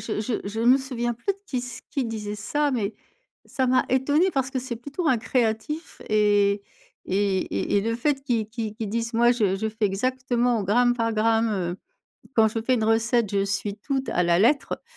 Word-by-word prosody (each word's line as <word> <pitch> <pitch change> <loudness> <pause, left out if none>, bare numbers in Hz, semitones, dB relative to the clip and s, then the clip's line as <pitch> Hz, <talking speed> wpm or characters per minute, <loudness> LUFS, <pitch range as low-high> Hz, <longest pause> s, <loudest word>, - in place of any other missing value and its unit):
Je 215 -2 -3
je 225 +2 -2
je 220 +2 -4
me 250 +4 +5
souviens 240 -3 -2
plus 235 - -2
de 390 - -20
qui 255 -9 -3
sai 245 -1 -7
qui 270 -3 -1
disait 210 -2 -4
ça, 290 +7 0
mais 220 -4 -1 0.5
ça 260 - -1
m'a 255 0 +3
étonnée 290 +8 +2
parce 265 -1 0
que 260 -1 -2
c'est 245 -2 -5
plutôt 285 +7 -3
un 250 - +3
créatif 245 +7 -2
et 205 -1 +3 0.4
et 195 0 +1
et 205 - +1
et - - +2
le 230 +2 -1
fait 275 +2 0
qu'il 235 -5 0
qu'il 220 -1 -4
qu'il 225 -3 -4
dise: 230 +1 -2
«Moi, 240 +1 +5
je 210 -6 +1
je 220 +3 -2
fais 220 0 0
exactement 245 +2 0
au - - -2
gramme 245 +5 +3
par 230 -1 0
gramme, 225 +1 +2
heu, 180 -2 -2 0.6
quand 220 -1 +5
je 225 +1 -3
fais 255 +3 +1
une 225 - 0
recette 225 0 +2
je 200 -1 +1
suis 200 +1 -2
tout 270 +5 -2
à 180 - +1
la 170 +1 +3
lettre», 275 +6 +2
230 Hz, 215 wpm, -25 LUFS, 210-255 Hz, 0.6 s, me